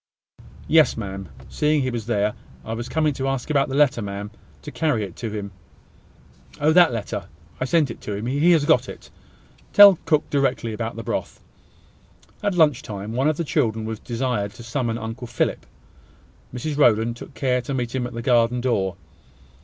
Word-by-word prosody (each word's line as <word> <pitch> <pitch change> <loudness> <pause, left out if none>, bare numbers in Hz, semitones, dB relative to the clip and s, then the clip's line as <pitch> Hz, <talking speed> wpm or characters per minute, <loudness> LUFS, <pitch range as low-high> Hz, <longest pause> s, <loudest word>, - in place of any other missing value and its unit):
"Yes, 160 -1 +4
ma'am; 95 -4 -6 0.2
seeing 150 -1 +1
he 130 - -1
was 115 -2 -5
there, 105 -2 +1 0.3
I 110 - -4
was 120 +1 -5
coming 155 -2 +1
to 135 0 -3
ask 135 +2 -2
about 140 -2 +2
the 135 - -3
letter, 140 -5 +3
ma'am, 100 0 -5 0.3
to 150 - -7
carry 150 -10 0
it 95 -4 -7
to 115 - -4
him." 105 -2 -5 1.1
"Oh, 155 +2 +3
that 175 -3 +6
letter 105 -4 -4 0.3
I - - 0
sent 145 -1 +2
it - - -10
to 105 - -5
him. 105 +3 -5
He 145 +7 +2
has 155 -3 +3
got 125 -2 +3
it. - - -11 0.6
Tell 200 -4 +9
cook 155 -1 +2
directly 135 -5 0
about 115 +1 -4
the 115 - -6
broth." - - -4 1.0
At 205 -3 0
lunch 150 -6 +4
time, 105 0 -6
one 130 +4 +1
of 155 - -1
the 170 - -1
children 115 -8 0
was 110 -1 -5
desired 120 -4 -2
to 120 - -12
summon 115 -1 -2
Uncle 115 +2 -6
Philip. 115 - -2 0.8
Mrs 145 +4 -4
Rowland 115 -3 +3
took - - -11
care 125 -2 0
to 130 +3 -5
meet 120 -2 -3
him 125 -2 -1
at 125 - -10
the 115 0 -5
garden 120 -1 +3
door. 100 -8 0
120 Hz, 190 wpm, -23 LUFS, 110-145 Hz, 1.1 s, Tell